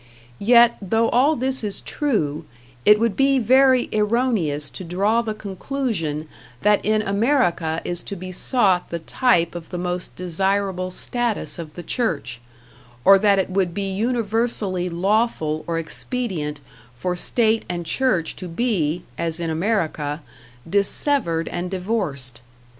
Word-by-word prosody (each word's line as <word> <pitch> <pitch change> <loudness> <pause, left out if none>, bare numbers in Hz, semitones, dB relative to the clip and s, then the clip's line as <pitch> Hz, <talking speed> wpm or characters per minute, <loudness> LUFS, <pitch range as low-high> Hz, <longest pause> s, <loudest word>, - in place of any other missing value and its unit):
Yet, 235 +2 +5
though 225 +4 +1
all 280 +6 +3
this 260 -1 0
is 205 -2 -1
true, 165 - -2 0.4
it 210 0 +7
would 230 -3 +1
be 275 0 +3
very 260 +1 +4
erroneous 210 - +1
to - - -7
draw 200 +7 +1
the 220 -2 -4
conclusion 200 - -3 0.4
that 210 +3 +3
in 215 0 +1
America 200 - +1
is 175 -1 -2
to 200 - -4
be 185 0 -7
sought 190 -2 +2
the 170 - -3
type 170 0 +1
of 170 -2 -8
the 180 - -5
most 180 0 -4
desirable 185 +1 -1
status 235 0 -3
of 155 -2 -8
the 175 - -7
church, 155 - -2 0.6
or 195 0 +8
that 200 -1 +4
it 190 -1 0
would 185 -3 0
be 195 -1 -2
universally 220 -4 -1
lawful 175 -4 0
or 165 -1 -1
expedient 165 - -3 0.3
for 180 +8 -2
state 225 +4 +1
and 175 -1 -3
church 185 -3 0
to 185 - -6
be, 175 -4 -1 0.2
as 165 0 -2
in 165 -1 -2
America, 160 -5 -1 0.4
dissevered 200 - +1
and 175 +1 -4
divorced. 180 - -3
195 Hz, 140 wpm, -22 LUFS, 170-230 Hz, 0.6 s, or